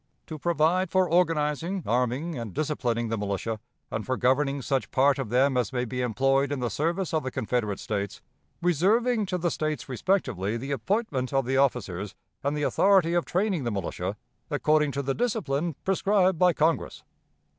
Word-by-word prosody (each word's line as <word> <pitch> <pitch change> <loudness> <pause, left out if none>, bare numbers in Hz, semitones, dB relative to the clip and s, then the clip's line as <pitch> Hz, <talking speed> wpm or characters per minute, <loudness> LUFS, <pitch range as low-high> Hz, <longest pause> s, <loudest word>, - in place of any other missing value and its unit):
' - - -46
"'To 155 -2 -7
provide 170 +3 +2
for 185 0 +3
organizing, 165 +1 +1
arming, 125 +8 0
and 115 -7 -6
disciplining 120 -7 -1
the 115 - -1
militia, 105 +2 -2 0.3
and 110 - -2
for 130 +2 -2
governing 135 +2 +2
such 135 +1 -1
part 140 +1 +3
of 135 - -3
them 130 +3 +3
as 125 -2 0
may 125 -1 -1
be 125 +1 -3
employed 135 +4 +1
in 145 - -1
the 120 -3 -2
service 170 - -1
of 160 - +2
the 130 - -3
Confederate 110 -4 -2
States; 100 -2 -3 0.4
reserving 210 - +2
to 180 - -1
the 175 -1 0
States 155 -1 -2
respectively 120 - 0
the 135 +4 -5
appointment 140 - -1
of 135 -2 +1
the 130 +2 0
officers, 105 -8 0 0.3
and 140 +2 0
the 150 - -1
authority 190 0 +4
of 175 -1 +1
training 185 -4 0
the 120 - -1
militia, 100 -3 -3 0.3
according 150 -1 +2
to 140 +1 -3
the 135 0 0
discipline 170 - -1
prescribed 190 -2 +2
by 180 -1 +5
Congress.' 160 0 0
140 Hz, 175 wpm, -27 LUFS, 125-175 Hz, 0.4 s, by